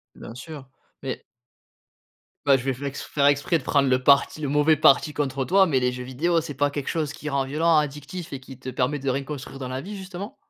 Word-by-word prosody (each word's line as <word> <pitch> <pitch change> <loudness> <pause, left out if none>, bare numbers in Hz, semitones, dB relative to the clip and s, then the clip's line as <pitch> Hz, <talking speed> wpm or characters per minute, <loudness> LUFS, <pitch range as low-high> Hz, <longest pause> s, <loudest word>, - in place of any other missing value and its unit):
Bien 115 - -10
sûr, 140 0 -9 0.3
mais 130 - -4 1.2
Bah, 140 -1 +6
je 130 - -7
vais 135 - +1
fai 140 +2 -5
faire 140 +1 0
exprès 145 +4 +2
de 145 - -9
prendre 140 0 +2
le 130 0 +2
parti 140 +2 +4
le 145 - -2
mauvais 150 +2 +4
parti 150 +1 +4
contre 135 -2 -2
toi, 195 +1 +5
mais 140 -7 +1
les 125 0 0
jeux 125 0 -6
vidéos, 165 +7 0
c'est 155 -2 -6
pas 145 +2 +1
quelque 145 -2 -4
chose 155 -3 -2
qui 150 - -6
rend 140 -2 0
violent, 160 +4 +2
addictif 150 +3 -3
et 135 - -6
qui 130 -1 -12
te 130 - -11
permet 130 +3 -1
de 135 0 -2
rien 135 +2 -1
construire 135 -1 -7
dans 130 - -5
la 130 +1 -3
vie, 200 +9 -7
justement? 190 +2 -8
140 Hz, 235 wpm, -24 LUFS, 135-155 Hz, 1.2 s, Bah